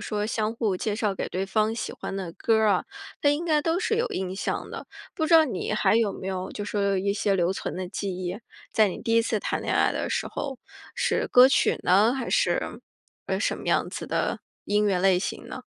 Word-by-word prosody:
说 210 -1 -1
相 215 0 -1
互 220 -4 0
介 205 +3 -2
绍 210 -3 0
给 - - -4
对 190 +1 -2
方 215 +3 +1
喜 230 - -4
欢 195 - -6
的 185 -4 -5
歌 225 +6 +1
儿 220 -1 +3
啊， 190 -3 +3 0.4
他 285 - +3
应 290 +4 +1
该 305 -3 +2
都 330 +3 0
是 440 +3 0
有 470 +2 +1
印 190 0 -3
象 195 - -3
的， - - -7 0.3
不 315 -3 -1
知 330 - +4
道 320 - +8
你 220 -6 -3
还 215 - +3
有 225 -2 +3
没 190 - -7
有 185 -1 -3
就 205 - -5
说 200 -1 0
一 200 +2 0
些 200 -1 +1
留 175 0 +2
存 190 - -5
的 185 - -3
记 200 +2 -4
忆， 185 +2 -4 0.3
在 215 -2 +4
你 - - -5
第 230 - -1
一 230 - +6
次 225 -1 0
谈 - - -2
恋 - - -1
爱 - - +3
的 - - -2
时 - - -1
候， 270 -3 -5 0.4
是 - - 0
歌 250 +1 +8
曲 275 - +2
呢？ 205 +7 +4
还 260 -3 -4
是， - - 0 0.5
呃， - - -1
什 - - -1
么 - - -9
样 - - +1
子 - - -6
的 - - -1 0.2
音 210 +1 +2
乐 195 -3 +2
类 185 0 +4
型 185 - -4
呢？ - - -7
210 Hz, 260 characters per minute, -26 LUFS, 190-235 Hz, 0.5 s, 道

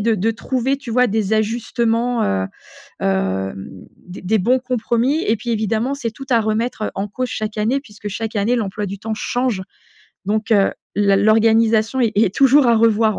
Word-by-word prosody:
de 225 +2 +2
de 220 +5 +1
trouver, 260 +4 -1
tu 275 -3 -9
vois 250 +2 +3
des 215 -1 -1
ajustements, 230 +2 0
heu, 95 -1 0 0.5
hem, 95 0 -1 0.4
des 180 +1 -9
des 215 +4 +1
bons 245 +7 +2
compromis 250 +4 0
et 220 - +1
puis 230 +2 -7
évidemment 225 +4 0
c'est 240 -5 -4
tout 270 +4 -10
à 235 -2 +4
remettre 220 0 -2
en 195 +1 -3
cause 250 +4 -4
chaque 215 0 -4
année, 230 +6 +1
puisque 210 -5 -9
chaque 220 +2 -5
année 215 +4 +1
l'emploi 210 -2 -3
du 200 0 -6
temps 220 +1 -4
change 245 -4 -1 0.6
donc, 215 +3 -1
heu, 200 -2 +3 0.2
la 200 -1 +3
l'organisation 220 +3 +3
est 230 -3 +2
est 205 -2 +2
toujours 275 0 +5
à 230 - +4
revoir 220 -1 +3
220 Hz, 180 wpm, -19 LUFS, 205-240 Hz, 0.6 s, toujours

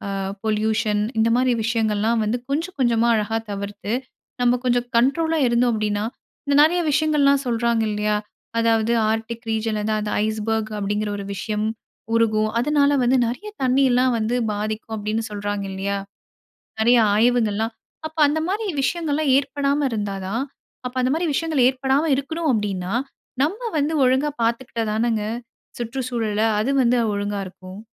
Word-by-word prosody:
அ - - -2 0.3
pollution 215 -1 +1 0.2
இந்த 225 +1 +3
மாரி 250 0 +3
விஷயங்கள்லாம் 225 0 +1
வந்து 215 +3 0
கொஞ்சம் 330 +6 -2
கொஞ்சமா 235 -2 +3
அழகா 220 +1 0
தவிர்த்து 200 +1 -5 0.5
நம்ம 245 0 +3
கொஞ்சம் 245 0 +1
கண்ட்ரோலா 320 +6 +2
இருந்தோம் 240 +1 +2
அப்படின்ன, 210 -1 -1 0.5
இந்த 285 0 +1
நெறைய 330 +4 +4
விஷயங்கள்லாம் 285 -2 +3
சொல்றாங்க 235 -1 +1
இல்லையா? 210 0 0 0.4
அதாவது 225 0 +2 0.2
ஆர்க்டிக் 225 +1 -4
ரீஜியனில 220 -1 -1
அந்த 215 - 0
அந்த 210 0 -3
ஐஸ்பர்க் 220 0 -1
அப்படிங்கிற 205 +1 -1
ஒரு 200 - -6
விஷயம் 210 +2 -2 0.5
உருகும். 215 -1 +2
அதனால 285 +2 +3
வந்து 250 +2 +3
நெறைய 250 - -5 0.2
தண்ணியெல்லாம் 255 -1 +3
வந்து 225 +2 0 0.2
பாதிக்கும் 215 +2 -4
அப்படின்னு 215 +2 -2
சொல்றாங்க 205 -1 -3
இல்லையா? 195 +1 -2 0.8
நெறைய 240 +2 +5 0.2
ஆய்வுகள்ல்லாம். 225 -1 +2 0.3
அப்ப 315 +1 -10
அந்த 310 +2 0
மாரி 420 +3 -1 0.2
விஷயங்கள்ல்லாம் 305 -2 0
ஏற்படாம 280 0 0
இருந்தா 205 -3 -2
தான் 230 +7 -1 0.4
அப்ப 250 - -6
அந்த 255 0 +1
மாரி 335 +2 -1
விஷயங்கள் 305 -3 +1
ஏற்படாம 265 +3 +1
இருக்கணும் 320 +4 -2
அப்படின்னா 195 -4 -2 0.5
நம்ப 355 - 0 0.2
வந்து 295 +2 0
ஒழுங்கா 260 +4 +2
பார்த்துக்கிட்டா 230 0 -1
தானங்க? 220 0 0 0.6
சுற்று 240 +2 -4
சூழல. 220 -4 -1 0.2
அது 230 +6 0
வந்து 245 0 +3 0.2
ஒழுங்கா 205 0 -2
இருக்கும். 185 +1 -11
230 Hz, 140 wpm, -22 LUFS, 215-265 Hz, 0.8 s, நெறைய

